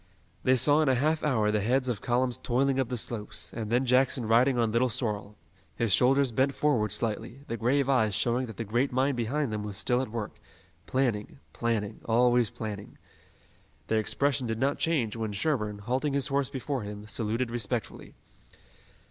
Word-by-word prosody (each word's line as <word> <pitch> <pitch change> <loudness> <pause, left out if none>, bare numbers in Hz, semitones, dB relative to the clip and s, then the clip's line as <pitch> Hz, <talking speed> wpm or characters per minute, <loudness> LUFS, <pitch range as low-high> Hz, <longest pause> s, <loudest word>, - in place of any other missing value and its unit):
They 130 - +4
saw 145 +5 +4
in 155 - +2
a 130 - +4
half 155 +5 +1
hour 110 -8 +2
the 105 -1 +1
heads 130 +5 +1
of 120 -5 -2
columns 125 0 0
toiling 135 +2 +1
up 130 - 0
the 125 - -2
slopes, 110 -2 -3
and 110 -2 -4
then 125 +2 +2
Jackson 125 0 +2
riding 120 +4 +4
on 115 -2 +1
Little 120 +3 +2
Sorrel, 105 -4 -3 0.4
his 115 -4 +1
shoulders 135 +1 +4
bent 135 +4 +1
forward 120 -9 +1
slightly, 115 +4 -3
the 115 - -3
grave 130 +4 +1
eyes 110 -7 +2
showing 120 +4 0
that 110 -4 -10
the - - -2
great 120 +6 0
mind 130 +2 +1
behind 125 +2 -1
them 105 - -2
was 105 -2 -6
still 125 +5 +1
at 130 - -4
work, 110 -2 -5 0.5
planning, 125 -5 -1 0.2
planning, 110 -3 -2
always 120 0 +3
planning. 105 -2 -7 0.9
Their 110 - +2
expression 135 +4 0
did 115 -1 -2
not 135 +4 0
change 130 -10 0
when 110 -2 -3
Sherburne, 105 -3 -1
halting 130 +7 -1
his 140 -2 +1
horse 140 -1 0
before 135 0 -3
him, 105 0 -7
saluted 115 +2 -2
respectfully. 120 0 -4
120 Hz, 180 wpm, -28 LUFS, 110-130 Hz, 0.9 s, They